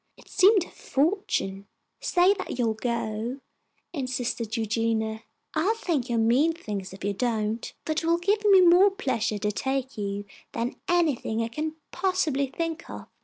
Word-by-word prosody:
It - - -18
seemed 395 -1 +5
a - - -12
fortune. 270 - -1 0.3
"Say 360 +3 +4
that 395 - -5
you 245 - +1
will 220 - +1
go," 230 +1 -2 0.6
insisted 245 -5 -2
Eugenia. 220 0 0 0.3
"I'll 365 +8 +2
think 325 - -1
you're 235 - +1
mean 245 +9 +3
things 205 - -5
if 190 0 -11
you 200 +1 0
don't, 225 0 -1
for - - -1
it 315 +1 -1
will 335 +1 +3
give 405 +5 +1
me 395 -3 +7
more 360 +3 +7
pleasure 260 - -1
to 210 +1 -1
take 265 +2 -2
you 200 0 -3 0.3
than 235 +2 -2
anything 300 -10 +1
I 225 - -3
can 310 +6 -3 0.2
possibly 345 -7 0
think 330 +4 -4
of." - - -8
255 Hz, 165 wpm, -26 LUFS, 220-340 Hz, 0.6 s, me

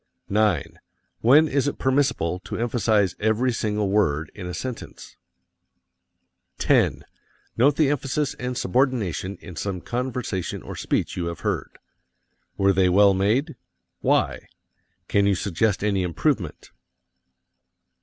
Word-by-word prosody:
9. 105 -6 +1 0.4
When 145 +7 +6
is 140 -1 0
it - - -2
permissible 130 - +1
to - - -5
emphasize 110 -4 +1
every 110 +4 +1
single 105 -3 -1
word 80 -7 +1
in 95 -4 -7
a 90 - -5
sentence? 130 -3 -7 1.4
10. - - +2 0.5
Note 135 +5 +4
the 145 -3 +3
emphasis 145 0 -1
and 125 0 -3
subordination 110 - 0
in 90 - -10
some 95 +2 -3
conversation 120 -4 -3
or - - -7
speech - - -1
you 85 -2 -2
have 85 -1 -6
heard. - - -3 0.8
Were 100 0 +3
they 95 -1 +3
well 100 +2 +5
made? 115 - +1 0.4
Why? - - +1 0.6
Can 100 0 +2
you 100 - +3
suggest 100 +3 0
any 100 -2 +1
improvement? 90 - -2
105 Hz, 125 wpm, -24 LUFS, 95-125 Hz, 1.4 s, When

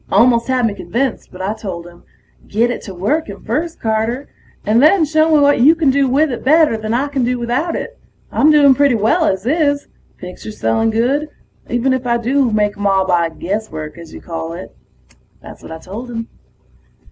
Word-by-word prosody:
Almost 235 +3 +4
had 255 -2 +1
me 220 - 0
convinced, 250 +5 -3
but 185 +1 -8
I 200 +3 -1
told 190 -6 -7
him, 175 0 -15 0.5
"Get 230 +4 +1
it - - -5
to 195 - -8
working 205 - -2
first, 315 +9 -3
Carter, 225 +5 -1 0.4
and 220 +3 +3
then 315 +3 +5
show 310 +1 +2
me 305 - +5
what 285 -3 +3
you 305 +6 +6
can 315 -5 +2
do 275 0 +2
with 290 +3 +2
it 245 - -5
better 305 -2 +4
than 220 0 -4
I 255 +5 0
can 280 -3 -2
do 250 +1 0
without 245 +8 -2
it. - - -6 0.3
I'm 300 - +3
doing 290 -3 +6
pretty 280 -1 +3
well 230 - +2
as 190 -6 -1
is... 285 0 0 0.3
pictures 185 +4 -9
selling 115 - +1
good, 260 +7 0 0.4
even 245 +2 +1
if 255 -1 -3
I 235 0 +2
do 255 +2 +1
make 210 -1 0
'em 205 - 0
all 195 -1 +2
by 170 -2 +1
guesswork, 165 -3 -5
as 165 -2 -11
you - - -10
call 165 -1 -6
it." 180 +2 -10 0.6
That's - - -13
what - - -11
I 160 - -6
told 210 +9 -8
him. 230 -1 -5
235 Hz, 205 wpm, -17 LUFS, 205-285 Hz, 0.6 s, you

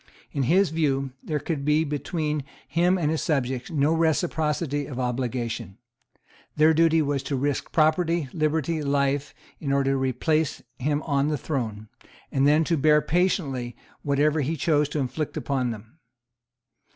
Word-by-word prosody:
In 140 - -2
his 185 0 +4
view 140 -4 0
there 155 - -2
could 150 -1 -3
be 150 +2 +3
between 150 0 -2 0.2
him 175 +3 +2
and 155 -4 0
his 160 - -1
subjects 130 -4 -1
no 150 -1 +2
reciprocity 155 -3 0
of 130 -3 -6
obligation. 120 -5 -3 0.8
Their 155 +1 +5
duty 165 0 +4
was 140 -1 -1
to 140 - -3
risk 140 +2 -1
property, 160 0 +2
liberty, 155 0 0
life, 140 0 0 0.2
in 140 -3 -3
order 140 0 +2
to 135 - +1
replace 135 +4 0 0.2
him 145 +3 0
on 140 -2 +1
the 150 -1 0
throne, 110 -7 -4 0.4
and 135 0 +3
then 150 +2 +4
to 165 +1 0
bear 150 +1 +5
patiently 150 - 0 0.3
whatever 145 +2 +2
he 155 +4 -1
chose 150 -1 +2
to 150 - -3
inflict 145 +3 -3
upon 130 -3 -1
them. 115 +6 -9
150 Hz, 150 wpm, -25 LUFS, 135-160 Hz, 0.8 s, Their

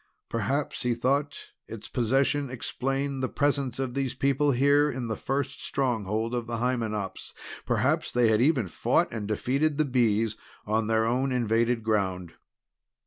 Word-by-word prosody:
Perhaps, 130 +6 -1
he 120 -1 0
thought, 140 +5 -1 0.2
its 110 -2 -8
possession 135 +3 +1
explained 135 +2 -2
the 130 - -1
presence 140 -4 0
of 130 -2 -2
these 135 -1 -2
people 140 +2 +2
here 140 +3 +4
in 125 -3 -4
the 110 - -1
first 140 +3 -3
stronghold 115 -3 -1
of 120 -1 -2
the 120 -1 -3
Hymenops; 110 -5 -2 0.3
perhaps - - +1
they 120 -2 +3
had 110 +1 +3
even 130 - +3
fought 85 - +1
and 110 -3 -4
defeated 140 +8 0
the 155 - +2
Bees 115 -4 +1 0.3
on 110 +1 0
their 110 0 +2
own 130 +4 +1
invaded 115 -1 +1
ground. 95 -5 -1
125 Hz, 150 wpm, -27 LUFS, 110-135 Hz, 0.3 s, here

